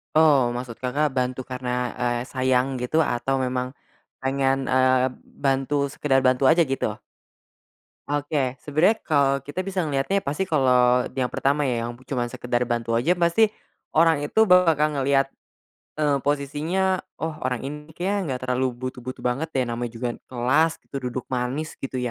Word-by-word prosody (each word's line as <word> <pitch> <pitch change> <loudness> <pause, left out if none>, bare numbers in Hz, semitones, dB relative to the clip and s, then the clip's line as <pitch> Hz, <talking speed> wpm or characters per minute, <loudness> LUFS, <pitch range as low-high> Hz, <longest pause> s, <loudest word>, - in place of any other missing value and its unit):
Oh, 145 -6 +5
maksud 120 -1 -5
Kakak 140 +4 +1
bantu 125 0 0
karena, 125 0 -4 0.3
eee, 120 -1 0
sayang 130 +1 +1
gitu 140 +6 +1
atau 135 -2 +1
memang 125 -1 -1 0.5
pengen, 135 0 +1
eee, 130 0 +3 0.4
bantu 135 +1 +1 0.2
sekedar 135 -3 +2
bantu 130 +1 +2
aja 170 +1 +5
gitu? 135 - 0 1.2
Oke, 145 -3 -1
sebenarnya 155 - +2
kalau 140 -3 +3
kita 145 +6 -3
bisa 185 -2 -2
ngeliatnya 150 +7 0
pasti 150 +7 -2
kalau 125 -4 +4
yang 130 -2 -1
pertama 140 +2 +1
ya 115 -2 -1
yang 120 - -5
cuma 130 -2 -2
sekedar 120 0 -2
bantu 115 -1 -1
aja 135 +10 +3
pasti, 175 +5 +3 0.5
orang 160 -2 +4
itu 220 - +2
bakal 160 -5 +4
ngelihat, 135 0 +2 0.7
eee, 145 -2 +1
posisinya, 150 +7 0 0.2
"Oh 160 0 -3
orang 125 -2 -2
ini 150 +2 -7
kayaknya 185 -6 -1
gak - - -10
terlalu 130 +1 +1
butuh-butuh 130 0 -6
banget 130 +6 -1
deh 130 - +2
namanya 120 0 -3
juga 125 +1 -2 0.2
kelas 135 +7 +2
itu 140 - -8
duduk 125 0 -5
manis." 130 +5 -2
Gitu 135 -1 -5
135 Hz, 150 wpm, -24 LUFS, 125-155 Hz, 1.2 s, Oh